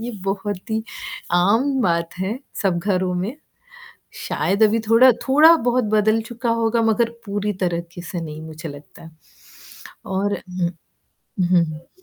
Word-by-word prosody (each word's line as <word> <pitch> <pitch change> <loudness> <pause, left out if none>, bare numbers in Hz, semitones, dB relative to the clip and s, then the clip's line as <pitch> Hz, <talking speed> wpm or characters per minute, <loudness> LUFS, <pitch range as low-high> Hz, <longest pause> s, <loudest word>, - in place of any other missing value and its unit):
ये 235 +2 -4
बहुत 195 +2 -3
ही 220 0 0 0.5
आम 225 +10 +3
बात 170 -2 0
है 195 +6 -2 0.2
सब 180 -3 +1
घरों 185 -1 0
में, 195 +9 -3 0.9
शायद 200 +3 +1
अभी 220 +1 +4
थोड़ा 250 +3 +7 0.2
थोड़ा-बहुत 265 -4 +5
बदल 215 +1 +3
चुका 235 +1 -4
होगा, 230 0 +1
मगर 225 +1 +2 0.2
पूरी 205 0 -2
तरीके 170 0 -3
से 175 0 -5
नहीं 155 -1 -7
मुझे 160 0 -8
लगता 145 +3 -13
है 160 - -12 0.9
और 200 +1 -1
उहुँ। 180 -2 -3 0.7
हुँ, 175 -1 +4
हुँ। 155 +1 -9
200 Hz, 140 wpm, -21 LUFS, 175-230 Hz, 0.9 s, थोड़ा